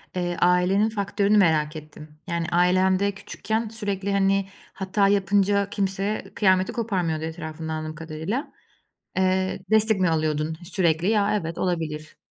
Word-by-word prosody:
eee, 175 -1 -2
ailenin 180 +4 +3
faktörünü 205 0 +1
merak 160 -5 +3
ettim. 155 0 -11
Yani, 170 -2 -2
ailen 185 +2 +3
de 200 0 +1
küçükken 220 +3 -4
sürekli, 200 -3 -3
hani, 195 0 +2 0.3
hata 195 +1 +1
yapınca 200 0 +2
kimse 195 0 -2
kıyameti 185 -2 +3
koparmıyordu 180 -9 -1
etrafında 160 0 -5
anladığım 155 0 -5
kadarıyla. 165 - -4 0.7
Eee, 185 0 +1
destek 220 -1 +3
mi 185 -2 +3
alıyordun 155 0 -1
e - - -11
sürekli? 170 -1 +1
Ya, 210 -1 +2
evet, 165 +1 -6
olabilir. 160 -3 -3
185 Hz, 135 wpm, -24 LUFS, 160-200 Hz, 0.7 s, ailenin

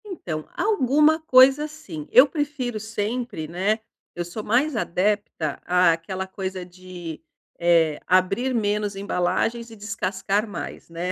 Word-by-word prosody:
Então, 170 - -6
alguma 310 - +3
coisa 275 -1 +5
sim, 195 - -9
eu 255 +3 +8
prefiro 275 -6 -3
sempre, 220 -4 -3
né. 190 +7 0 0.4
Eu 175 - -3
sou 190 +5 -6
mais 255 +7 +1
adepta 195 -6 -1
àquela 180 +1 +1
coisa 190 -1 -5
de, 180 -2 -9 0.4
eh, 165 -3 +3
abrir 195 +8 +2
menos 210 -2 0
embalagens 200 +5 -1
e 225 - -11
descascar 205 0 -2
mais, 205 - -7
né? 170 +2 -3
205 Hz, 125 wpm, -24 LUFS, 180-250 Hz, 0.4 s, eu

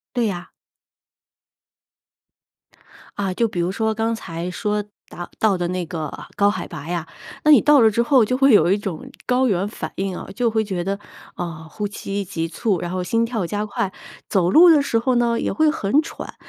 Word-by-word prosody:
对 240 -2 +2
呀。 180 -4 -5 2.7
啊， 195 -2 -1
就 230 +5 +1
比 180 -5 -3
如 170 +1 0
说 220 +3 -1
刚 225 +1 0
才 175 -5 -5
说， 210 +2 -2 0.2
达 175 - -8
到 210 -4 +3
的 175 -1 -2
那 180 -1 -2
个 155 -3 -4 0.2
高 200 0 +3
海 - - -4
拔 155 -2 -8
呀， 170 -2 -3 0.4
那 305 - +5
你 290 - +8
到 295 -2 +5
了 225 - +6
之 235 +3 +1
后 255 -2 +4
就 255 +4 0
会 270 0 +5
有 180 -4 +5
一 205 - +2
种 190 -6 -6 0.2
高 255 +1 +2
原 195 -2 0
反 160 -7 -6
应 190 -1 -2
啊。 - - -7
就 245 -2 +1
会 220 0 0
觉 190 -4 -3
得， 195 +2 -2 0.4
啊， 160 -2 -6
呼 210 +4 -3
吸 200 0 -4
急 165 -3 -3
促， 190 +2 -1
然 175 - -4
后 185 0 -2
心 230 +5 +1
跳 225 -6 -2
加 205 +4 -2
快， 200 -2 -2 0.4
走 180 -3 +2
路 345 - +8
的 305 -3 +6
时 235 -5 0
候 255 +3 +1
呢， 235 -1 +2
也 - - -1
会 315 -1 +3
很 285 +1 +1
喘。 - - -8
205 Hz, 220 characters per minute, -21 LUFS, 175-230 Hz, 2.7 s, 你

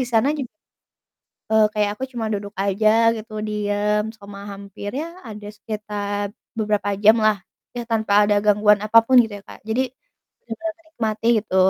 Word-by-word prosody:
di - - +1
sana 235 +2 +3
ju 280 - -3 1.1
eee, 220 0 +5
kayak 210 -2 +1
aku 260 - -3
cuma 230 -3 -3
duduk 205 -1 -4
aja 200 +2 +2 0.3
gitu, 220 0 -9 0.2
diem 210 0 0
selama 200 -1 -11
hampir, 200 +1 -8
ya 335 +2 -7
ada 210 -1 -9
sekitar 205 -1 -4 0.3
beberapa 210 -2 0
jamlah, 215 -1 +5 0.4
ya 240 - -2
tanpa 220 -3 0 0.2
ada 205 - +3
gangguan 210 0 +5
apa 215 +2 +6
pun 260 - +4
gitu 230 -3 +5
ya, - - -24
Kak. - - -11
Jadi, 225 +3 +1 0.7
bener 325 +9 -4
menikmati 225 -9 -4
gitu, 200 -2 -4
215 Hz, 160 wpm, -22 LUFS, 205-225 Hz, 1.1 s, apa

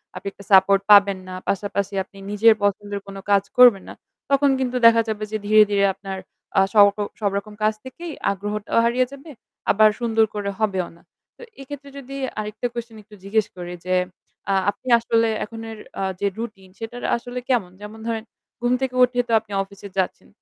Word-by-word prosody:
আপনি - - -7
একটা 200 - -15
সাপোর্ট 195 0 +6
পাবেন 200 -1 +7
না, 185 - -7 0.2
পাশাপাশি 200 0 -2
আপনি 195 - -20
নিজের 220 +2 +6
পছন্দের 205 0 -1
কোন 195 - -9 0.2
কাজ 200 -1 +4
করবেন 245 -6 +7
না। - - -8 0.4
তখন 280 0 +4
কিন্তু 255 -1 -1
দেখা 230 0 +7
যাবে 215 -1 -3
যে 215 - -1
ধীরে, 215 0 +7
ধীরে 200 0 +3
আপনার 195 0 -7 0.4
অ্যাঁ 195 0 +4
সব 205 -2 +8 0.3
সবরকম 200 0 -2
কাজ 215 0 +3
থেকেই 335 +6 -8 0.2
আগ্রহটাও 205 +2 -3
হারিয়ে 250 +2 +2
যাবে, 280 +3 -12 0.4
আবার 215 +1 +6
সুন্দর 225 -2 +2
করে 205 -1 -2
হবেও 190 -5 0
না। 170 - -21 0.4
তো - - -16 0.2
এক্ষেত্রে 280 +1 -9
যদি 275 0 -8 0.2
আরেকটা 215 +3 -3
কোশ্চেন 235 -1 -6
একটু 210 +1 -16
জিজ্ঞেস 210 +2 +1
করি 175 0 -6
যে, 185 - +1 0.5
অ্যাঁ 195 -1 +2
আপনি 255 - -19
আসলে 230 0 +2 0.2
এখনের 225 0 -8 0.2
অ্যাঁ 190 -1 -2
যে 200 - +1
রুটিন 210 -5 -7
সেটার 235 +2 -7
আসলে 245 +1 -6
কেমন? 225 -9 +1
যেমন 210 +2 -9
ধরেন 225 -1 -2 0.4
ঘুম 240 0 +1
থেকে 260 -1 -2
উঠেই 245 0 +2
তো - - -2
আপনি 215 -1 -19
অফিসে 200 +1 -12
যাচ্ছেন। 190 -1 -2
215 Hz, 180 wpm, -22 LUFS, 200-235 Hz, 0.5 s, সব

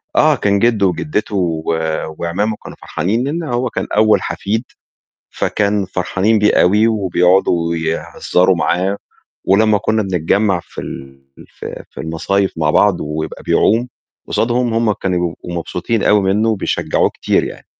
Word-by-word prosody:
آه، 155 0 +5
كان 100 -5 +1
جِدّه 115 -3 +2
وجِدّته 105 +1 -2
و 85 -4 -1 0.6
وأعمامه 100 +6 -1
كانوا - - -10
فرحانين 105 +9 -1
لإن 160 +5 -2
هو 125 -4 -1
كان - - -4
أول 110 0 +4
حفيد، 110 +4 -2 0.7
فكان 100 -1 0
فرحانين 95 +4 0
بيه 105 0 +3
أوي 105 +5 +4
وبيقعدوا 90 -4 +2
ويهزّروا 85 +3 0
معاه، 90 +3 0 0.5
ولمّا 105 +2 +3
كُنّا 110 +2 0
بنتجمّع 95 +1 +1
في - - -9
ال 70 0 -9 0.3
في - - -9
في - - -9
المصايف 95 +5 -1
مع 75 -2 +2
بعض 100 +4 +3
ويبقى 75 +1 -5
بيعوم 115 +4 +2 0.4
قصادهم 120 0 0
هم 115 -2 +2
كانوا 90 -2 -2
بيبقوا 85 +1 -9
مبسوطين 100 +6 -2
أوي 105 0 +4
منّه 100 +3 +1
وبيشجّعوه 110 -3 0
كتير - - 0
يعني. - - -9
100 Hz, 140 wpm, -17 LUFS, 90-110 Hz, 0.7 s, آه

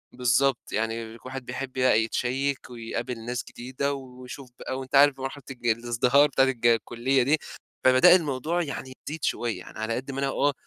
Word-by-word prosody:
بالضبط، 125 +1 +1
يعني 115 +1 -3
كُل - - -25
واحد 130 0 -6
بيحبّ 130 +1 -5
بقى 130 -4 +3
يتشيّك 130 +5 -2
ويقابل 115 0 -5
ناس 125 0 -3
جديدة 130 +3 -3
ويشوف 130 0 -9
بقى، 130 - -4
وأنتَ 130 +1 -4
عارف 140 0 +6
بمرحلة 135 +1 -6
الج 120 -2 -6
الازدهار 120 +5 +3
بتاعة 135 -1 +3
الج 125 -3 +1
الكُلّية 120 +3 +2
دي. 150 +5 +3 0.5
فبدأ 130 +8 +7
الموضوع 160 +1 0
يعني 135 -3 -6 0.2
يزيد 155 0 -7
شُويّة، 115 -6 -1
يعني 90 - -11
على 110 +1 -1
قدّ 135 +2 -5
ما 135 - -4
أنا 140 - 0
آه، 140 +1 +1
130 Hz, 180 wpm, -26 LUFS, 120-135 Hz, 0.5 s, فبدأ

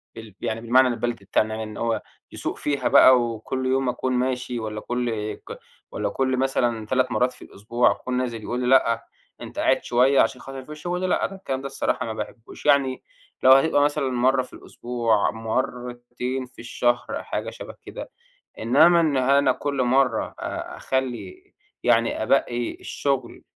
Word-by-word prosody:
بال 110 -4 -11
يعني 115 -1 -2
بالمعنى 130 +3 +4
البلدي 120 -3 -3
بتاعنا 110 +2 +1
يعني 110 - -4
إن - - -9
هو 115 -2 -1 0.3
يسوق - - -4
فيها 145 -2 -1
بقى 130 -2 +7
وكل 120 +3 -3
يوم 130 0 +1
أكون 130 +1 -2
ماشي 125 -1 -1
والّا 105 -1 -5
كل 115 -4 -2
ك - - -11 0.3
والّا - - -2
كل 130 -1 0
مثلًا 120 -4 0
3 130 +2 +1
مرّات 125 +1 +2
في - - -18
الأسبوع 120 +4 0
أكون 125 0 -3
نازل 120 -4 -3
يقول 120 +3 -3
لي 125 - -1
لأ 115 -3 +3 0.4
أنت - - -7
قاعد - - +2
شوية 130 +3 +3
عشان 125 - 0
خاطر 135 0 -8
ما - - -9
فيش 150 0 -10
شُغل، 180 +1 -2
لأ، - - +2
ده 195 - -6
الكلام 135 -9 -4
ده 140 - -4
الصراحة 130 - -1
ما 110 - -4
باحبهوش، 110 +4 -8
يعني 140 -3 +3 0.4
لو 130 - +8
هيبقى 145 +2 +5
مثلًا 145 -2 +1
مرّة 130 +1 +2
في 130 - -11
الأسبوع، 115 -5 -1
مرّتين 125 +2 -3
في 125 - -19
الشهر 120 0 0 0.2
حاجة - - -4
شَبه - - -10
كده، - - -9 0.5
إنّما 145 +10 +5
إن 155 -4 +1
أنا 135 +1 +4
كل 140 -1 -2
مرّة 130 +1 +1
آآ، - - -5
أخلّي 130 - -4 0.3
يعني 115 -1 +2
أبقِّي 120 0 0
الشُغل 135 -4 -3
125 Hz, 175 wpm, -24 LUFS, 115-135 Hz, 0.5 s, لو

